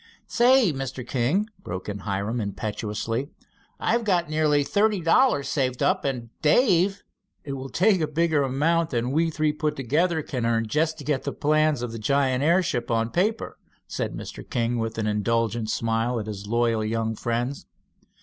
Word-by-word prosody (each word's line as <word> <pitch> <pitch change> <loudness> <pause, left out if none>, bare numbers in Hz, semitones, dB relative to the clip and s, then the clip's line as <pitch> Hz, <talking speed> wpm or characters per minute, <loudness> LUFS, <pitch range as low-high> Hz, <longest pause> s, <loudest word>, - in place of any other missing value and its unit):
"Say, 245 - +4
Mr. 135 -2 -5
King," 140 - +1 0.2
broke 90 +1 -6
in 100 -1 -4
Hiram 100 +4 -2
impetuously, 105 +5 -3 0.5
"I've 235 +1 +1
got 175 -6 +1
nearly 150 -2 +2
thirty 205 +7 +1
dollars 165 - +3
saved 130 -2 -1
up, 140 - +1
and 120 -4 -3
Dave 190 - +3 0.2
" - - -49
"It 140 - -5
will 135 0 -6
take 180 -4 +2
bigger 165 -3 +2
amounts 155 +5 +1
than 120 +1 0
we 165 +3 +2
three 155 -1 0
put 150 0 -2
together 155 +5 0
can 125 -4 -4
earn 115 -1 +1
just 155 +6 0
to 145 - -9
get 145 -2 0
the - - -2
plans 155 -3 +1
of 120 - -3
the 115 - -6
giant 135 +2 +1
airship 170 -6 +1
on 115 0 0
paper," 215 +6 -1 0.3
said - - -4
Mr. - - -8
King, 120 0 0
with 115 0 -3
an 110 - -1
indulgent 110 +1 0
smile 115 +2 0
at 105 - -5
his 100 -2 -7
loyal 115 -1 +1
young 110 +1 -1
friends. 120 +5 -3
135 Hz, 170 wpm, -25 LUFS, 115-160 Hz, 0.5 s, Say